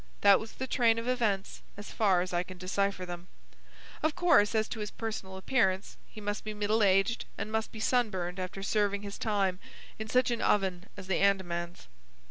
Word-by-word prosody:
That 200 -1 +7
was 220 - -8
the 260 - -4
train 235 -3 +3
of 230 +1 -4
events 220 -6 -1 0.2
as 205 - -8
far 195 -5 +3
as 180 0 -4
I 175 - +2
can 185 +1 -9
decipher 190 +1 -1
them. 175 0 -7 0.7
Of 310 -1 +1
course 285 -12 +4
as 220 0 +2
to 225 - -5
his 210 -1 -3
personal 205 -4 -5
appearance 190 -3 +1
he - - -11
must 205 0 -3
be 215 0 -5
middle 210 +2 +1
aged, 195 +3 +3
and 215 - -4
must 220 0 -1
be 220 - -9
sunburned 195 -7 0
after 185 +1 -5
serving 205 0 0
his 200 -1 -7
time 195 -4 0 0.4
in 220 0 -5
such 250 +1 +3
an 235 - -1
oven 190 -3 +1
as 190 - -8
the 190 -1 0
Andamans. 175 -3 0
205 Hz, 195 wpm, -30 LUFS, 190-220 Hz, 0.7 s, That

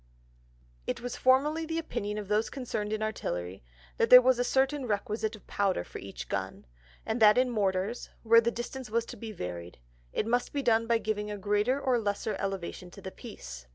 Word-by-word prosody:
_ - - -33 0.8
It - - -2
was 245 +1 -5
formerly 290 +5 +3
the 325 0 -3
Opinion 210 -10 -3
of 210 -2 -5
those 210 +2 +1
concerned 220 -6 -4
in 215 0 -1
Artillery, 90 - -4 0.3
that - - +2
there 250 - +12
was 255 0 +3
a - - +3
certain 265 +1 +1
requisite 215 +1 -1
of 215 - -16
Powder 195 - 0
for - - -9
each 100 0 -8
Gun, - - -4 0.4
and 225 +1 -2
that 210 0 +7
in 255 0 +3
Mortars, 200 +1 -1
where 230 0 +7
the 235 - +1
distance 240 +1 -6
was 230 +1 0
to 245 - -8
be 225 0 -7
varied, 90 - -6 0.3
it - - -1
must 245 +2 0
be 285 -1 -1
done 230 -2 +3
by 230 0 +4
giving 210 -1 -2
a 210 - -4
greater 210 +6 +1
or 255 -3 +2
lesser 210 0 -2
Elevation 190 -2 -4
to - - -13
the 190 - -6
Piece. - - -10
220 Hz, 205 wpm, -29 LUFS, 200-245 Hz, 0.8 s, there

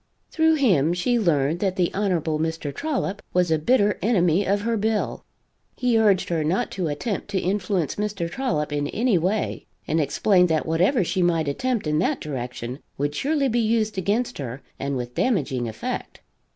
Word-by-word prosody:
Through 320 0 +3
him 175 - +3
she 240 +7 +1
learned 160 -5 +1
that 190 -2 0
the 180 -2 +1
Hon. 200 0 0 0.3
Mr. 160 -3 -2
Trollop 265 - -2
was 180 -2 +2
a 160 - +3
bitter 205 +4 +2
enemy 185 -3 +2
of 200 +1 +1
her 230 +2 0
bill. 220 0 -1 0.5
He 250 -2 +1
urged 200 -4 +3
her 165 -3 0
not 185 +10 0
to 180 -4 -2
attempt 155 +8 -3
to 200 -2 -1
influence 185 -3 -1
Mr. 205 -4 -2
Trollop 160 - -2
in 145 0 -1
any 220 - +1
way, 195 +5 -1 0.2
and 160 +2 +1
explained 180 +5 +3
that 160 -1 +1
whatever 180 - +2
she 185 +2 -1
might 165 -3 +2
attempt 235 - -1
in 150 0 +1
that 265 - +1
direction 125 -3 -5 0.2
would 145 +1 -1
surely 280 - +1
be 240 -1 +1
used 220 -1 +1
against 210 +5 -1
her 130 -1 -6 0.2
and 140 -1 -2
with 125 0 -5
damaging 140 - 0
effect. 110 - -5
180 Hz, 180 wpm, -24 LUFS, 155-220 Hz, 0.5 s, Through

